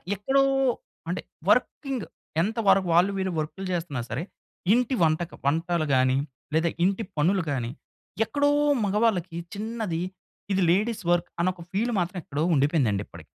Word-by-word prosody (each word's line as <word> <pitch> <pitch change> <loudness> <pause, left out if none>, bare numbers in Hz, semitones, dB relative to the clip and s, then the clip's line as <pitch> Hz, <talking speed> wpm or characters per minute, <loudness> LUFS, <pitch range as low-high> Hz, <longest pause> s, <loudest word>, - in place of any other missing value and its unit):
ఎక్కడో 270 +8 +2 0.7
అంటే - - -2 0.3
వర్కింగ్ 270 -6 +1 0.4
ఎంత 215 +6 -1
వరకు 190 -2 +5
వాళ్ళు, 180 +4 +5
వీళ్ళు 190 -1 -1
వర్క్‌లు 160 +5 -4
చేస్తున్నా 165 -7 -2
సరే! 130 +9 -2 0.5
ఇంటి 250 +2 +2
వంటకు 160 +1 +1
వంటలు 165 +3 +1
గాని, 130 0 +3 0.4
లేదా 165 +1 +3
ఇంటి 195 +4 +1
పనులు 180 +5 +2
గాని, 120 -4 -2 0.5
ఎక్కడో 285 +4 +1 0.4
మగవాళ్ళకి 195 -4 +1 0.2
చిన్నది 215 -5 -3 0.5
ఇది 190 - +2
లేడీస్ 215 +3 +1
వర్క్ 175 0 +1
అన్న 175 +2 +3
ఒక 170 - -10
ఫీల్ 225 +5 0
మాత్రం 180 +2 -2
ఎక్కడో 145 +2 -2
ఉండిపోయిందండి 135 - +2
ఇప్పటికి. - - -12
180 Hz, 140 wpm, -26 LUFS, 160-210 Hz, 0.7 s, వరకు